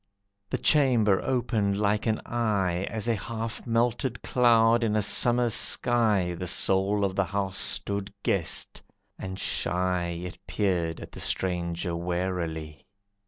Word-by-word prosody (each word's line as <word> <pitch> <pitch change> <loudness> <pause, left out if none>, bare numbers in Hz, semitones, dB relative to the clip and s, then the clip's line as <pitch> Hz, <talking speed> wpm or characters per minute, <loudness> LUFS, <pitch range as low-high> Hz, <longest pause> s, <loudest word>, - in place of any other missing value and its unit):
The - - -1
chamber 120 -10 +3
opened 110 -6 0
like 105 +2 +1
an 110 -1 0
eye, 100 -6 0
As 110 -1 -3
a 115 - +3
half 115 +3 -5
melted 120 +2 0
cloud 115 -1 +4
in 110 -2 +1
a 110 - +2
Summer 120 +3 +2
sky 110 -6 +2
The 90 +2 -5
soul 100 +2 +2
of 95 -1 -3
the 100 - +1
house 95 0 -3
stood 100 0 -2
guessed, 95 -5 0 0.4
and 95 0 -6
shy 90 -2 -1
It 90 - -8
peered 90 -5 -1
at - - -10
the - - -10
stranger 85 -1 -1
warily. 85 -3 -4
100 Hz, 135 wpm, -27 LUFS, 90-115 Hz, 0.4 s, cloud